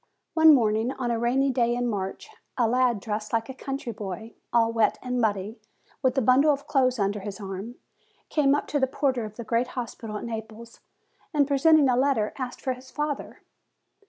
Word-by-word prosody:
One 320 -2 +7
morning, 225 0 +1
on 245 -2 -2
a 230 - 0
rainy 265 +4 +2
day 240 -1 +1
in 245 0 -1
March, 200 - -4 0.3
a 240 -3 +3
lad 245 -1 +2
dressed 210 +1 -4
like 225 +1 -1
a - - -5
country 270 -1 -5
boy, 215 +1 -7 0.2
all 230 -1 +3
wet 215 -2 +2
and 250 -1 -1
muddy, 210 0 -1 0.4
with 260 -1 +1
a 265 - +3
bundle 265 +6 +5
of 285 0 -3
clothes 255 -2 +2
under 205 0 0
his 200 0 -7
arm, 195 +4 -6 0.5
came 285 -2 +3
up - - -2
to 290 - 0
the 265 - +2
porter 260 -3 0
of 215 0 -9
the 235 - -6
great 235 +2 0
hospital 225 -3 -5
at - - -7
Naples, 225 0 -7 0.6
and, 285 -2 +4
presenting 290 +1 +5
a 250 - +3
letter, 250 -5 +1
asked 255 -1 -5
for 260 - -1
his 255 +1 -13
father. 295 0 -4
240 Hz, 195 wpm, -26 LUFS, 220-265 Hz, 0.6 s, One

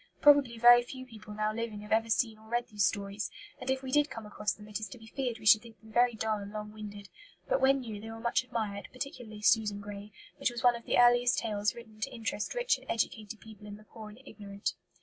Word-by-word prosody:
Probably 285 -5 +6
very 240 +1 +8
few 255 +1 -8
people 215 -3 -11
now 215 0 0
living 225 -2 -4
have 210 - -11
ever 225 +1 +2
seen 225 -1 +1
or 220 0 -17
read 240 +1 -1
these 205 -2 +2
stories; 200 +2 -3 0.3
and 255 - -6
if 265 0 0
we 260 - -5
did 295 +1 +3
come 225 -1 -7
across 210 0 -2
them 210 0 -9
it 210 +1 -4
is 220 - -4
to 190 - -10
be 225 - -14
feared 245 0 -3
we 215 - -13
should 215 0 +8
think 230 -2 -15
them 220 0 -16
very 240 +1 +3
dull 220 -1 -1
and 200 0 -7
long 210 0 -6
winded. 205 -2 -8 0.4
But - - +1
when 270 0 +4
new 220 -4 -6
they 225 - -8
were 225 0 -7
much 235 +2 +1
admired, 215 -5 -4
particularly 245 -5 -7
Susan 210 -2 +3
Grey, 205 0 -8 0.3
which - - +1
was 240 -1 -6
one 245 -1 +6
of 235 - -9
the - - +1
earliest 245 0 +5
tales 210 -2 0
written 220 -2 -12
to - - -1
interest 225 - -3
rich - - +2
and - - -18
educated 220 -1 -2
people 215 -2 -12
in 205 - -7
the 215 - -16
poor 215 0 -11
and 210 +3 -13
ignorant. 200 -4 -5
220 Hz, 250 wpm, -31 LUFS, 210-240 Hz, 0.4 s, very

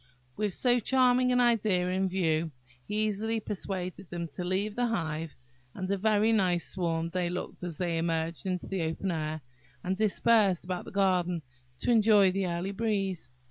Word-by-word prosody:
With 210 -1 -1
so 245 -1 +3
charming 250 +1 +3
an 250 - +3
idea 215 -7 +2
in 190 +1 0
view, 165 -3 0 0.4
he 210 +1 0
easily 220 +2 -1
persuaded 190 -3 -4
them 170 -1 -4
to 180 - -6
leave 195 +4 -1
the 245 0 +1
hive; 160 - -3 0.4
and 185 -1 -4
a - - +3
very 215 +2 +2
nice 185 -6 +2
swarm 165 -2 -1
they 180 0 -1
looked 180 +1 -5
as 170 -4 -5
they 170 -2 -1
emerged 165 +1 -2
into 185 -1 -2
the 190 -2 -3
open 165 +4 -2
air, 155 -1 -3 0.4
and 185 +1 -1
dispersed 210 -2 +3
about 180 -1 -4
the - - -9
garden 180 -4 +1 0.3
to - - 0
enjoy 210 -4 +5
the 195 0 -1
early 175 +3 -2
breeze. 195 - -2
190 Hz, 175 wpm, -29 LUFS, 175-215 Hz, 0.4 s, enjoy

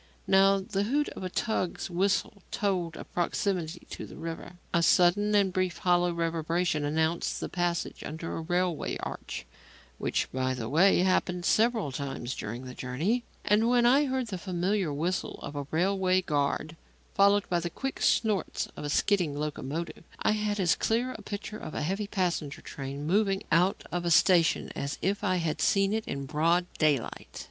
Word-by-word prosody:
Now 195 0 +5
the 195 0 -2
hoot 290 +6 +1
of - - -9
a 185 - -2
tug's 185 -2 -1
whistle 195 +2 0
told 180 -5 -1
of - - -10
proximity 175 -1 -1
to - - -6
the - - -11
river. 165 +1 -6 0.2
A 170 - +3
sudden 190 +5 +4
and 195 -3 +3
brief 185 -3 0
hollow 175 -1 +2
reverberation 165 -1 0
announced 160 +3 0
the - - -3
passage 175 -1 -2
under 160 +2 -5
a - - -3
railway 175 0 -1
arch - - -5 0.5
(which, - - 0
by 130 0 -1
the 115 -3 -4
way, 170 - +5
happened 180 -1 +1
several 220 - +2
times 135 -2 -4
during 120 +3 -6
the 125 - -7
journey); 165 - -1 0.2
and, 220 +3 +3
when 245 -1 +4
I 275 +5 +5
heard 260 -2 -1
the 190 -3 -4
familiar 185 -1 -1
whistle 170 +6 -2
of 145 - -6
a 145 -1 -4
railway 185 +2 +2
guard 150 +1 -1 0.4
followed 200 0 +4
by 175 - +1
the 175 +1 -3
quick 270 +10 -5
snorts 215 -4 +1
of - - -7
a 145 - -3
skidding 175 -3 +2
locomotive, 150 +2 -4 0.2
I - - +2
had 210 -1 -1
as 175 -3 +4
clear 240 +3 0
a 220 - -8
picture 205 +1 -6
of 155 - -7
a - - -2
heavy 195 +6 -2
passenger 175 -7 -2
train 140 +1 -6
moving 195 +3 +2
out 180 +4 +3
of 175 0 -2
a - - +1
station 170 0 +4
as 140 +1 -3
if 200 +3 0
I 185 -2 +2
had 165 -3 -1
seen 195 0 +3
it 220 0 -1
in 140 0 -4
broad 165 +5 +2
daylight. 145 -6 0
180 Hz, 175 wpm, -29 LUFS, 160-200 Hz, 0.5 s, Now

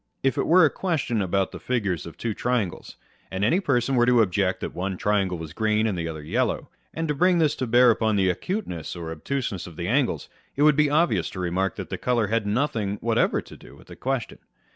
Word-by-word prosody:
If 135 -1 +2
it - - -1
were 175 0 +6
a 150 - +2
question 150 - -1
about 95 0 0
the - - -8
figure 110 -7 -1
of 85 - -5 0.2
fcwo 115 -3 -3
triangles, 120 -8 -2 0.3
and 95 +2 -1
any 165 - +3
person 135 - +1
were 120 -1 +3
to 120 -2 +5
object 95 -1 0
that - - -4
one 95 +1 -3
triangle 100 -3 0
was 80 -1 -8
green 110 +1 +1
and 105 -4 0
the 85 -1 -3
other 80 -2 -6
yellow, 120 - -1 0.2
and 160 -2 -2
bring 180 0 +4
this 155 -3 +2
to 130 - -2
bear 120 +1 +6
upon 110 -1 +1
the 95 -2 +2
acuteness 90 - -3
or 85 -2 -6
obtuseness 105 - -3
of 85 - -11
the - - -4
angles, - - 0 0.3
it 145 - +2
would 150 -1 +6
be 150 0 +3
obvious 145 - +2
to - - -8
remark 90 +1 -1
that - - -7
the - - -3
colour 120 -5 +1
had 115 -2 0
nothing 105 -3 -1
to - - 0
do - - -14
with - - -17
the - - -10
question. 135 -2 -3
110 Hz, 225 wpm, -25 LUFS, 95-135 Hz, 0.3 s, were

